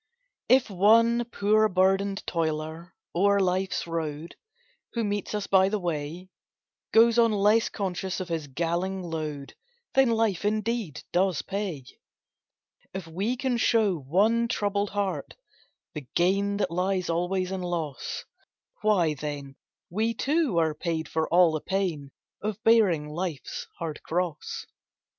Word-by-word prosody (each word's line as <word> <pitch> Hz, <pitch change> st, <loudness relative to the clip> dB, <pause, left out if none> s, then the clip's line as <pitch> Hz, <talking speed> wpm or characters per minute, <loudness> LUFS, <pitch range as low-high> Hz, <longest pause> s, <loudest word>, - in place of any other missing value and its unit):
If 255 Hz, 0 st, +5 dB
one 230 Hz, +5 st, +4 dB
poor 215 Hz, -1 st, +2 dB
burdened 195 Hz, +1 st, +1 dB
toiler 160 Hz, +1 st, -3 dB, 0.2 s
o'er 200 Hz, +3 st, +4 dB
life's 185 Hz, 0 st, 0 dB
road, 160 Hz, -1 st, -4 dB, 0.6 s
Who 235 Hz, -, -1 dB
meets 205 Hz, 0 st, -2 dB
us 205 Hz, -1 st, -2 dB
by 190 Hz, -1 st, +4 dB
the 215 Hz, -, 0 dB
way, 170 Hz, 0 st, -4 dB, 0.6 s
Goes 230 Hz, +1 st, +6 dB
on 230 Hz, -1 st, +5 dB
less 210 Hz, +2 st, +3 dB
conscious 190 Hz, -2 st, -3 dB
of 185 Hz, -, -4 dB
his 165 Hz, -4 st, -3 dB
galling 175 Hz, +6 st, -2 dB
load, 155 Hz, -4 st, -5 dB, 0.4 s
Then 265 Hz, -2 st, +5 dB
life, 220 Hz, -6 st, +1 dB
indeed, 215 Hz, -, -1 dB
does 185 Hz, -2 st, +1 dB
pay. 190 Hz, -9 st, -4 dB, 1.1 s
If 190 Hz, -3 st, -4 dB
we 195 Hz, +10 st, -2 dB
can 255 Hz, -1 st, 0 dB
show 220 Hz, -4 st, +3 dB
one 210 Hz, -, +2 dB
troubled 205 Hz, -3 st, 0 dB
heart 200 Hz, -2 st, -3 dB, 0.6 s
the 150 Hz, -6 st, -7 dB
gain 200 Hz, +3 st, +2 dB
That 200 Hz, -, -1 dB
lies 185 Hz, +1 st, 0 dB
alway 180 Hz, +3 st, 0 dB
in 190 Hz, 0 st, -4 dB
loss, 165 Hz, -6 st, -4 dB, 0.6 s
Why, 185 Hz, -7 st, +3 dB
then, 145 Hz, -2 st, -6 dB, 0.4 s
we 220 Hz, +5 st, 0 dB
too 290 Hz, -, +1 dB
are 160 Hz, -2 st, +2 dB
paid 160 Hz, 0 st, -3 dB
for 160 Hz, +1 st, -1 dB
all 175 Hz, -1 st, +6 dB
the 155 Hz, -1 st, -2 dB
pain 180 Hz, -8 st, -2 dB, 0.3 s
Of 215 Hz, 0 st, -4 dB
bearing 200 Hz, -10 st, +4 dB
life's 155 Hz, -3 st, -5 dB
hard 160 Hz, -3 st, -5 dB
cross. 170 Hz, -2 st, -3 dB
185 Hz, 135 wpm, -27 LUFS, 165-210 Hz, 1.1 s, Goes